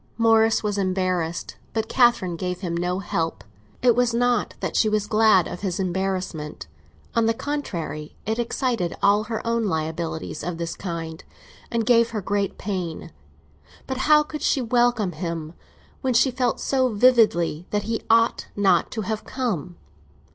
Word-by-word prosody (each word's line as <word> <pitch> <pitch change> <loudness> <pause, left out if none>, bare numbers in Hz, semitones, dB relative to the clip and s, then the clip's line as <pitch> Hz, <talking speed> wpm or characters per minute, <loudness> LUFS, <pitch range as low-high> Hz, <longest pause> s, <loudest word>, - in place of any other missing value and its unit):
Morris 225 -1 +4
was 205 -1 -1
embarrassed, 185 -3 -1 0.2
but 220 -1 -1
Catherine 240 -9 +3
gave 180 +1 -4
him 170 -3 -2
no 180 +1 -1
help. 165 -3 -2 0.4
It 245 -2 +5
was 245 -1 +2
not 245 -2 +1
that - - -3
she 215 - +3
was 210 -1 0
glad 215 -4 +4
of 180 - -6
his 190 -3 -2
embarrassment; 185 - -3 0.5
on 230 -1 +2
the 225 - +2
contrary, 170 - -4
it 220 +3 -1
excited 235 -6 -1
all 205 +2 +4
her 225 +1 -4
own 230 -1 +1
liabilities 160 -2 -3
of 175 0 -3
this 165 0 -4
kind, 165 -3 -5 0.5
and 230 -1 -1
gave 235 -1 +4
her 225 -2 -3
great 200 +1 -1
pain. 185 -5 -4 0.7
But 265 - -4
how 300 +2 +5
could 305 0 -7
she - - +2
welcome 240 -4 +2
him 165 -3 -5 0.5
when 260 -3 0
she 260 +3 +4
felt 250 -1 0
so 260 -2 +1
vividly 210 -8 +3
that 205 -1 -1
he 225 +2 -2
ought 230 0 +3
not 200 -1 +3
to 220 - -2
have 215 +1 -3
come? 185 - -3
205 Hz, 160 wpm, -24 LUFS, 175-235 Hz, 0.7 s, It